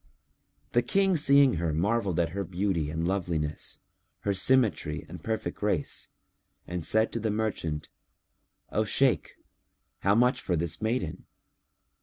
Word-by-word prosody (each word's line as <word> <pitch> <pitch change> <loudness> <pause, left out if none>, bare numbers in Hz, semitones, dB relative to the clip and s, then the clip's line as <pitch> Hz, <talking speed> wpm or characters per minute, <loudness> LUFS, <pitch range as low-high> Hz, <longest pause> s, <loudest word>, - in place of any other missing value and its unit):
The 120 - +4
King 195 +5 +2
seeing 140 - +5
her 80 -2 -1
marvelled 100 0 +1
at 85 -1 +2
her 100 +4 -3
beauty 90 -4 -1
and 80 +2 -2
loveliness, 85 -6 -2 0.4
her 100 - 0
symmetry 100 -7 +1
and - - -10
perfect 110 -1 -3
grace 100 -8 -1 0.6
and 90 -1 -4
said 110 +6 +2
to 115 - -2
the 110 0 -1
merchant, 100 -8 -2 0.8
"O 110 - +1
Shaykh, 125 +5 +2 0.6
how 100 +1 +3
much 125 +2 +3
for 90 - 0
this 80 0 -2
maiden?" 110 -7 -2
100 Hz, 135 wpm, -28 LUFS, 85-115 Hz, 0.8 s, seeing